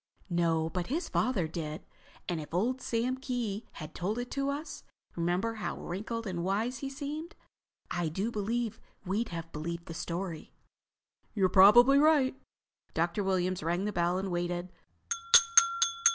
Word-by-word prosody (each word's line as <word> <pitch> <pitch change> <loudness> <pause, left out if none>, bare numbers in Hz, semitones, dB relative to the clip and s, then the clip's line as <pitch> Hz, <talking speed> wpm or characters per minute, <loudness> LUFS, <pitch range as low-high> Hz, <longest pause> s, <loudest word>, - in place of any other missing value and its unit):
"No, 165 -2 +2
but 175 +1 -3
his 325 +6 -2
father 200 -11 0
did. 155 -1 -5 0.4
And 170 -3 -2
if 150 +2 -7
old 250 +8 0
Sam 245 +3 -1
Kee 240 -5 -3
had 155 -1 -8
told 200 +6 -2
it 245 0 -4
to 275 0 -1
us—remember 225 - -3
how - - -3
wrinkled 225 +6 -4
and 175 -4 -3
wise 215 +7 -1
he 275 - -4
seemed?—I 285 - -6
do 195 +8 -2
believe 225 +1 -2 0.3
we'd 205 +5 -1
have 165 -1 -6
believed 170 +3 -5
the 165 - -7
story." 170 0 -5 0.8
"You're 190 -3 +3
probably 240 +9 +7
right." 295 -4 +4 0.6
Dr. 170 +5 0
Williams 185 -1 0
rang 175 +5 -1
the 210 - -2
bell 175 0 +1
and 190 0 -3
waited. 175 +1 -2
195 Hz, 140 wpm, -30 LUFS, 170-240 Hz, 0.8 s, probably